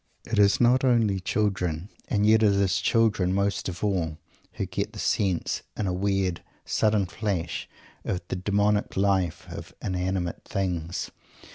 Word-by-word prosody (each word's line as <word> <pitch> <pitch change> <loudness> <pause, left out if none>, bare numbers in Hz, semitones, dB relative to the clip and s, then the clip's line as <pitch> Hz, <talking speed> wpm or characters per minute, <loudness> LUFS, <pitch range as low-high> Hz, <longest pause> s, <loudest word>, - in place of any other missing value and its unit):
It 115 -2 -1
is 100 -1 +5
not 125 +2 +4
only 115 -6 +3
children 95 -3 -1 0.2
and 105 -1 +1
yet 110 +1 +5
it 105 -2 +5
is 95 -2 +2
children 105 -6 +2
most 100 -1 0
of 90 +2 -7
all 85 -6 0 0.4
who - - -2
get - - -3
the - - -10
sense, 95 -5 0 0.2
in 105 - -1
a 90 - 0
weird, 95 -1 0 0.2
sudden 105 -2 +2
flash, 90 -3 -3 0.3
of 90 - -1
the - - -1
demonic 105 +2 +1
life 95 -4 +1
of - - -8
inanimate 90 -2 -2
things. 90 -3 -3
100 Hz, 150 wpm, -26 LUFS, 90-105 Hz, 0.4 s, is